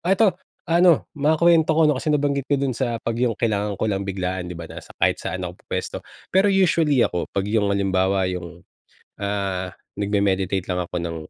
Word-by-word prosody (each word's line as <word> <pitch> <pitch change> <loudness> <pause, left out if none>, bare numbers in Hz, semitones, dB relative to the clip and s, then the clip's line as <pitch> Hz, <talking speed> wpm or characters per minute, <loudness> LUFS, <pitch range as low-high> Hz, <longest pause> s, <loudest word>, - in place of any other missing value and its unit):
Ah, 185 +3 +2
ito, 205 -1 +4 0.4
ano 170 -1 +4
makuwento 160 +2 +4
ko 160 - +4
'no, 150 - +2
kasi 155 - -3
nabanggit 140 -2 0
ko 145 - +3
dun 135 -2 0
sa 120 -3 -1
'pag 115 - -3
yung 120 -3 +1
kailangan 105 -3 -1
ko - - -2
lang 100 -1 -1
biglaan 95 -2 -3
di 90 - -7
ba, 85 - -7
na - - -8
sa - - -15
kahit - - +2
saan 95 +1 -4
ako 90 - -5
pupuwesto. - - -4 0.3
Pero 190 +2 +4
usually 165 -8 +3
ako, 90 - -2
'pag 100 - -1
yung 105 -1 +1
halimbawa 95 -1 +1
yung, 85 -1 -7 0.6
ah, 95 -2 -2 0.2
nagme-meditate 100 -2 0
lang 90 0 0
ako - - -6
ng, 85 -1 -4
100 Hz, 195 wpm, -22 LUFS, 95-145 Hz, 0.6 s, ito